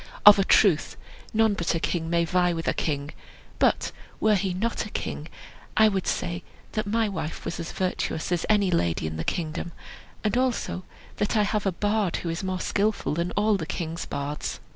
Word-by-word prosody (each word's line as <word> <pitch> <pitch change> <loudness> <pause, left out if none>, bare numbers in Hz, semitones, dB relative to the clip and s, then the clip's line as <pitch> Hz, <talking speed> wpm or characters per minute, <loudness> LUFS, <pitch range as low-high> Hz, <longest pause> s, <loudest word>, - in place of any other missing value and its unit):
"Of 210 -1 +11
a - - +5
truth, 190 -5 +4 0.3
none 220 -1 +3
but 170 -3 0
a - - +1
king 165 0 -1
may 170 0 +2
vie 180 +1 +2
with 165 -1 -4
a - - +3
king; 145 -1 -2 0.5
but - - +2 0.3
were 215 0 +4
he 195 -1 +1
not 215 +6 -1
a 215 - -7
king, 155 -6 -4 0.5
I 220 0 +7
would 195 -3 -2
say 175 0 -1 0.3
that 215 -1 -2
my 225 +1 +2
wife 185 -6 -4
was - - -3
as 165 - -4
virtuous 180 -3 -2
as 175 -2 +1
any 205 -3 +4
lady 85 - +1
in 80 0 -3
the 80 - -2
kingdom, 170 - -3 0.5
and 215 +2 +1
also 245 -7 0 0.3
that 205 +2 +1
I 210 - +4
have 210 -1 0
a - - +3
bard 205 0 0
who 170 - -3
is 165 +3 -3
more 185 -1 -2
skilful 210 -4 0
than 170 +3 -1
all 210 0 +3
the 160 -4 -5
king's 165 0 -4
bards." 145 +1 -4
185 Hz, 200 wpm, -26 LUFS, 165-210 Hz, 0.5 s, Of